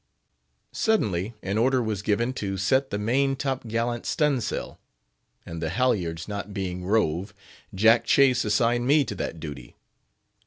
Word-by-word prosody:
Suddenly 110 - 0
an 100 +3 -1
order 130 +2 +3
was 110 -4 -2
given 115 +4 0
to 95 -5 -3
set 130 +8 +1
the 100 - -2
main 135 +6 +1
top 135 -3 -3
gallant 115 +1 -2
stun' 150 -4 +1
sail, - - -4 0.7
and 85 -1 -7
the 80 - -1
halyards 90 -6 0
not 100 -1 -6
being 90 -2 -3
rove, 95 -2 0 0.4
Jack 115 +4 +4
Chase 130 0 +4
assigned 115 +3 +1
to - - -2
me 145 +1 +5
that 100 -7 -5
duty. 75 -6 -8
110 Hz, 150 wpm, -25 LUFS, 95-125 Hz, 0.7 s, me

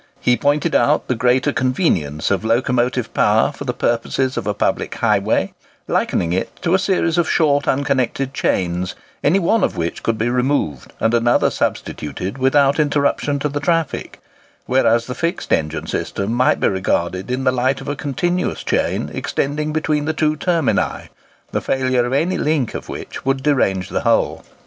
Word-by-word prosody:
He 125 - +3
pointed 145 +3 +1
out 150 - +2
the - - +1
greater 125 +4 +2
convenience 100 - 0
of 100 +1 0
locomotive 120 +1 0
power 105 +5 +3
for 140 - -8
the 125 - 0
purposes 130 +3 0
of - - -3
a 105 - +1
public - - -1
highway, - - +1 0.3
likening 85 0 0
it 95 +5 -2
to 175 -1 +1
a 190 - +4
series 180 -3 +1
of 165 - +1
short 145 -3 +2
unconnected 135 -1 0
chains, 90 -5 -1 0.3
any 160 +7 +4
one 195 +3 +2
of - - 0
which 85 0 -3
could 115 -1 -1
be 110 - 0
removed 125 - -1
and 110 - +1
another 120 +1 +3
substituted 90 - -3
without 140 +2 +3
interruption 145 -1 +1
to 140 - -1
the 145 0 -3
traffic; 165 0 -1 0.5
whereas 120 -2 +2
the 125 - -5
fixed 170 +5 -2
engine 80 0 -1
system 100 +3 -3
might 125 +2 +2
be - - +2
regarded 95 0 -1
in 130 +1 -1
the 130 - +3
light 130 +1 0
of 135 - -9
a 145 - -2
continuous 175 +6 -2
chain - - -1
extending 150 +2 -2
between 155 -1 0
the 160 - 0
two 155 -1 +1
termini, 165 -2 0 0.4
the - - -1
failure 130 -2 +1
of 125 - -3
any 170 +7 +1
link 150 -6 0
of - - -7
which - - -7
would 135 0 0
derange 100 -11 +1
the - - -1
whole. - - +1
130 Hz, 175 wpm, -19 LUFS, 115-150 Hz, 0.5 s, a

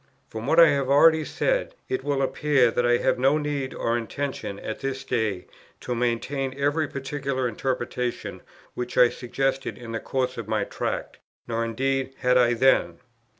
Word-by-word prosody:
From 110 +2 -6
what 160 +3 +4
I 165 - +9
have 140 -2 0
already 160 +3 +6
said, - - -1
it 385 0 -2
will 140 -1 0
appear 135 -3 +2
that 120 +1 +1
I 120 0 +4
have - - +1
no 135 +4 +4
need 145 -3 -2
or 115 - 0
intention 120 -3 -4
at 110 - -5
this 135 -1 -3
day 110 -8 -1 0.4
to 125 - -3
maintain 125 +3 -1
every 145 +2 +1
particular 140 -1 -3
interpretation 125 +1 -3 0.3
which 125 0 -5
I 125 - +7
suggested 135 +3 -2
in 120 -2 -9
the 115 - -2
course 130 +1 -2
of 115 - -6
my 110 -1 0
Tract, - - -4 0.3
nor 115 0 -1
indeed 135 +3 -1
had 125 -1 +2
I 120 -1 +4
then. 115 -9 +3
130 Hz, 170 wpm, -25 LUFS, 120-140 Hz, 0.4 s, I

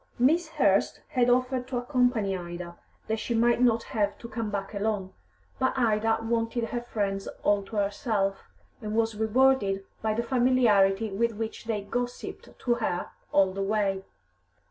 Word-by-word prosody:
Miss 315 +7 +3
Hurst - - +2
had 250 -4 +2
offered 255 0 +1
to 260 -2 -3
accompany 245 -6 +1
Ida, 175 -1 -6 0.3
that 220 0 -1
she 235 - -2
might 235 +1 +3
not 230 -2 +3
have 205 -2 -1
to 235 - -9
come 225 -1 -3
back 200 -1 -4
alone, 200 -2 -2 0.5
but 260 +1 +1
Ida 225 -2 +2
wanted 230 0 -1
her 240 - -2
friends 200 -4 -2 0.2
all 205 0 +3
to 220 - -9
herself, 200 -1 -1 0.4
and 215 -1 -4
was 225 0 +2
rewarded 220 -3 +2 0.2
by 215 -1 0
the 235 - 0
familiarity 230 -5 +3
with 230 +4 0
which 220 +2 -5
they 215 -3 -2
gossipped 245 +4 -4
to 240 - +1
her 220 -7 -2 0.2
all 190 -1 +4
the 195 - -3
way. 195 -1 0
220 Hz, 160 wpm, -27 LUFS, 200-240 Hz, 0.5 s, all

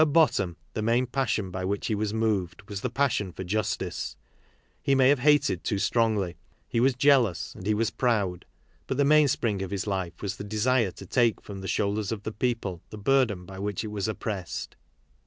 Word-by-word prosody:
At 150 -2 +3
bottom, 100 - +3 0.2
the 110 - -2
main 115 +3 +2
passion 115 -7 -1
by 95 0 -4
which 100 +2 -2
he 110 - 0
was 105 0 -1
moved 105 -5 -1
was 100 -2 -5
the 125 - -1
passion 120 -7 0
for 95 - -6
justice. 105 +4 -2 0.7
He 135 - +2
may 130 -1 +5
have 140 -1 +4
hated 145 - +3
too 100 - 0
strongly, 105 -4 +1 0.3
he 115 - 0
was 130 +1 +3
jealous, 125 - +3
and 95 - -8
he 105 - +3
was 115 +1 +1
proud. 100 -9 0 0.4
But 130 - -2
the 140 - +4
mainspring 140 -9 +3
of 95 - -3
his 100 -2 -2
life 95 -4 -3
was 100 -1 -3
the - - -6
desire 110 +2 +2
to 95 - -11
take 115 +2 +2
from 100 -2 -8
the 95 - -5
shoulders 105 +1 0
of 105 -2 -4
the 110 - -3
people 105 -6 -2
the 110 - -8
burden 105 -5 +2
by 95 +1 -9
which 100 0 -2
it 110 - -4
was 105 0 -2
oppressed. 105 -4 -4
105 Hz, 205 wpm, -27 LUFS, 95-125 Hz, 0.7 s, may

